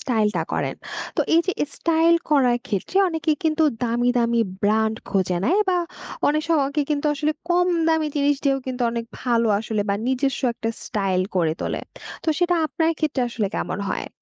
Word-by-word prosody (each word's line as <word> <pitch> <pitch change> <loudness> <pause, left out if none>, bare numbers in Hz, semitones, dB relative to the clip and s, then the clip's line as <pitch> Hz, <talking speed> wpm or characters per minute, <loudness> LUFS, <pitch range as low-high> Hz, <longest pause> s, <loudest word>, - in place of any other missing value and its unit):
স্টাইলটা 210 -8 +1
করেন। - - -1 0.4
তো - - +2
এই 335 - +6
যে 375 - +1 0.2
স্টাইল 330 0 +3 0.2
করার 255 -5 +4
ক্ষেত্রে 205 - -3
অনেকে 325 -2 0
কিন্তু 315 0 +2 0.2
দামি, 240 +1 +1
দামি 235 0 +2 0.2
ব্র্যান্ড 220 +1 +2
খোঁজে 185 -2 +1
নেয় 385 - +3
বা 360 -1 +3 0.5
অনেক 305 +1 +1
স - - -3 0.2
কে 300 - +2
কিন্তু 295 0 0
আসলে 305 +1 0 0.2
কম 355 +1 +3 0.2
দামি 320 -1 +2
জিনিস 285 0 +3
দিয়েও 275 -1 +3
কিন্তু 255 -1 -3
অনেক 230 0 -3 0.2
ভালো 235 -2 +2
আসলে 215 0 -2
বা 200 - +2
নিজস্ব 265 +1 0
একটা 225 - -3
স্টাইল 195 -3 0 0.2
করে 165 -3 +2
তোলে - - -2 0.4
তো - - -2
সেটা 355 -1 +2
আপনার 320 +3 0
ক্ষেত্রে 305 -4 0
আসলে 220 -3 -1
কেমন 190 - -3
হয়? - - -3
260 Hz, 175 wpm, -23 LUFS, 220-320 Hz, 0.5 s, এই